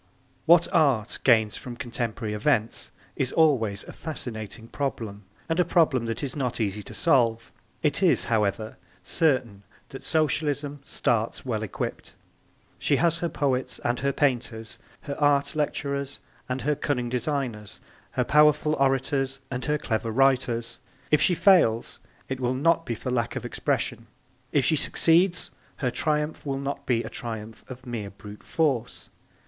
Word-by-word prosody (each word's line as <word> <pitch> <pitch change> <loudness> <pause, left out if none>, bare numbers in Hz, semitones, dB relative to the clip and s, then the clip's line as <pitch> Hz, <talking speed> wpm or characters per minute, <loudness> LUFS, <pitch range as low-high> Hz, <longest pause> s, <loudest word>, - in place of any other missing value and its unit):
What 170 +1 +6
Art 135 -9 +2
gains 110 -4 +4
from 125 -2 -8
contemporary 115 -2 -3
events 115 0 0 0.2
is 130 -2 -1
always 115 -11 +2
a - - -10
fascinating 115 -7 -7
problem 110 -7 -4 0.2
and 165 +1 -1
a - - +6
problem 155 -8 +2
that 115 +4 -3
is 135 -3 -3
not 125 -5 -2
easy 105 -1 -1
to - - -10
solve. 120 -8 +2 0.3
It - - +2
is, - - +5
however, 110 +2 -1 0.3
certain 130 - +1 0.3
that 135 - -9
Socialism 145 -2 0
starts 115 -4 -1
well 110 -4 -1
equipped. 110 - -5 0.6
She - - +2
has 165 -1 +2
her 170 - -1
poets 135 -5 -1
and 120 +1 +1
her 140 +1 +1
painters, 120 -6 -1 0.2
her 140 - -5
art 140 -1 +2
lecturers 140 -2 -2 0.3
and 125 +1 -2
her 150 - +2
cunning 135 -4 -2
designers, 125 -5 -3 0.3
her 125 - +1
powerful 150 +2 +4
orators 135 0 +1
and 125 -1 -3
her 150 +2 +1
clever 115 -4 -2
writers. 120 -2 +1 0.3
If 150 -1 +4
she 180 +3 +3
fails 165 - +3 0.3
it 130 -1 -4
will 125 0 0
not 165 +4 +2
be 115 - -1
for 125 - -5
lack 120 -2 -1
of - - -4
expression. - - -2 0.4
If 140 - +2
she 160 - +3
succeeds 170 +5 +2 0.2
her 125 -3 -1
triumph 150 +3 -1
will 135 -2 -2
not 140 +1 -4
be 120 -2 +2
a - - -6
triumph 110 -2 -6
of 130 0 -9
mere 115 -5 -4
brute 105 +1 -12
force. 135 -7 -1
130 Hz, 155 wpm, -26 LUFS, 115-150 Hz, 0.6 s, What